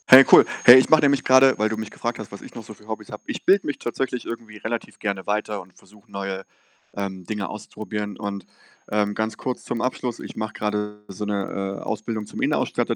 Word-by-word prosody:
Hey 130 Hz, +1 st, +11 dB
cool. -, -, +10 dB, 0.2 s
Hey, 120 Hz, +1 st, +12 dB
ich 130 Hz, -, +4 dB
mache 155 Hz, -, +6 dB
nämlich 140 Hz, -2 st, +3 dB
grade 130 Hz, 0 st, +6 dB
weil 110 Hz, +1 st, +1 dB
du 110 Hz, -, -3 dB
mich 110 Hz, -1 st, -5 dB
gefragt 120 Hz, 0 st, -4 dB
hast, 110 Hz, -, -8 dB
was 100 Hz, -, -9 dB
ich -, -, -12 dB
noch 115 Hz, -, -9 dB
so 110 Hz, -, -10 dB
für 105 Hz, +1 st, -20 dB
Hobbys 110 Hz, -1 st, -6 dB
habe. 105 Hz, -, -8 dB
Ich -, -, -5 dB
bilde 195 Hz, +2 st, +4 dB
mich 145 Hz, -, -2 dB
tatsächlich 125 Hz, +1 st, -3 dB
irgendwie 115 Hz, -2 st, -7 dB
relativ 115 Hz, +2 st, -5 dB
gerne 100 Hz, -3 st, -3 dB
weiter 105 Hz, 0 st, -2 dB
und 90 Hz, 0 st, -19 dB
versuche 105 Hz, -1 st, -21 dB
neue, 95 Hz, -1 st, -4 dB, 0.5 s
ähm, 95 Hz, -2 st, -5 dB
Dinge 105 Hz, +1 st, -3 dB
auszuprobieren 105 Hz, -1 st, -6 dB
und, 100 Hz, -2 st, -5 dB, 0.4 s
ähm, 105 Hz, -1 st, +1 dB
ganz 110 Hz, 0 st, -2 dB
kurz 130 Hz, -1 st, -4 dB
zum 115 Hz, -, -3 dB
Abschluss: 125 Hz, -1 st, -2 dB
ich -, -, -9 dB
mache 110 Hz, -1 st, -4 dB
grade 105 Hz, 0 st, -3 dB
so 95 Hz, +2 st, -7 dB
'ne, 100 Hz, -1 st, -3 dB
äh, -, -, -10 dB
Ausbildung 110 Hz, 0 st, -3 dB
zum -, -, -7 dB
Innenausstatter -, -, 0 dB
105 Hz, 220 wpm, -23 LUFS, 100-115 Hz, 0.5 s, Hey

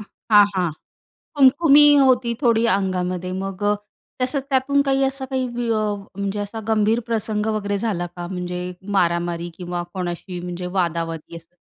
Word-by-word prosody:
हां, 210 Hz, 0 st, +3 dB
हां. 180 Hz, -3 st, 0 dB, 0.7 s
खुम-खुमी 290 Hz, +2 st, +6 dB
होती 255 Hz, -3 st, +3 dB
थोडी 235 Hz, -3 st, +3 dB
अंगामध्ये 185 Hz, -2 st, -2 dB
मग 195 Hz, +1 st, -5 dB
अ, 205 Hz, 0 st, +3 dB, 0.5 s
तसं 255 Hz, +3 st, +1 dB
त्यातून 275 Hz, +1 st, +2 dB
काही 275 Hz, -1 st, +1 dB
असा 270 Hz, 0 st, -1 dB
काही 260 Hz, -1 st, -2 dB
विय 240 Hz, -1 st, -1 dB
अ, 215 Hz, -1 st, 0 dB, 0.2 s
म्हणजे 200 Hz, +1 st, -2 dB
असा 205 Hz, +2 st, -5 dB
गंभीर 220 Hz, +1 st, +2 dB
प्रसंग 215 Hz, -2 st, -1 dB
वगैरे 205 Hz, -1 st, -1 dB
झाला 195 Hz, -5 st, -2 dB
का 175 Hz, -1 st, -6 dB
म्हणजे 180 Hz, -1 st, -4 dB, 0.4 s
मारामारी 170 Hz, -1 st, 0 dB
किंवा 175 Hz, -1 st, -4 dB
कोणाशी 180 Hz, 0 st, -5 dB
म्हणजे 180 Hz, 0 st, -5 dB
वादा-वादी 165 Hz, -2 st, -2 dB
असं? 165 Hz, +1 st, -13 dB
205 Hz, 150 wpm, -22 LUFS, 180-240 Hz, 0.7 s, खुम-खुमी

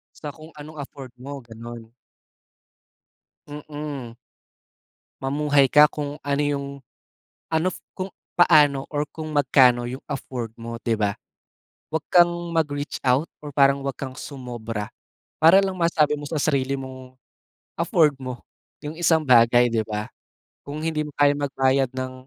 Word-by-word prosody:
Sa 150 Hz, -2 st, -7 dB
kung 155 Hz, 0 st, -13 dB
anong 150 Hz, +1 st, -10 dB
afford 135 Hz, -2 st, -8 dB
mo, 140 Hz, +1 st, -8 dB
ganun. 115 Hz, 0 st, -10 dB, 1.6 s
Mm. 145 Hz, -5 st, -7 dB, 1.0 s
Mamuhay 145 Hz, +1 st, +3 dB
ka 150 Hz, +3 st, +6 dB
kung 145 Hz, 0 st, -5 dB
ano 140 Hz, 0 st, 0 dB
yung, 140 Hz, -1 st, -1 dB, 0.8 s
ano, 165 Hz, +3 st, -1 dB, 0.2 s
kung 190 Hz, 0 st, -5 dB, 0.2 s
paano, 150 Hz, -6 st, +5 dB
or 150 Hz, -1 st, -1 dB
kung 155 Hz, 0 st, -7 dB
magkano 125 Hz, -4 st, +4 dB
yung 130 Hz, +3 st, -7 dB
afford 125 Hz, -5 st, -5 dB
mo, 115 Hz, 0 st, -6 dB
'di 115 Hz, -2 st, 0 dB
ba? 100 Hz, -1 st, +1 dB, 0.8 s
Huwag 155 Hz, -2 st, -3 dB
kang 175 Hz, -1 st, +6 dB, 0.2 s
mag-reach 145 Hz, -2 st, -2 dB
out, 135 Hz, +5 st, +2 dB, 0.2 s
or 150 Hz, -, -7 dB
parang 140 Hz, 0 st, +3 dB
huwag 135 Hz, -1 st, -4 dB
kang 130 Hz, -1 st, -6 dB
sumobra. 120 Hz, -6 st, -6 dB, 0.5 s
Para 170 Hz, +5 st, +7 dB
lang 190 Hz, -1 st, -2 dB
masabi 155 Hz, -3 st, +2 dB
mo 145 Hz, -, -7 dB
sa 160 Hz, -, -4 dB
sarili 140 Hz, -3 st, +1 dB
mong 130 Hz, -1 st, -8 dB, 0.6 s
afford 160 Hz, -3 st, +3 dB
mo 130 Hz, -2 st, -7 dB, 0.4 s
yung 150 Hz, +2 st, -7 dB
isang 160 Hz, -3 st, +2 dB
bagay, 120 Hz, 0 st, +6 dB
'di 115 Hz, -2 st, 0 dB
ba? 105 Hz, 0 st, -4 dB, 0.6 s
Kung 145 Hz, +2 st, -6 dB
hindi 155 Hz, -1 st, -1 dB
mo 150 Hz, -, -8 dB
kayang 145 Hz, 0 st, +4 dB
magbayad 135 Hz, -1 st, +1 dB
ng 130 Hz, 0 st, -4 dB
140 Hz, 140 wpm, -24 LUFS, 130-150 Hz, 1.6 s, Para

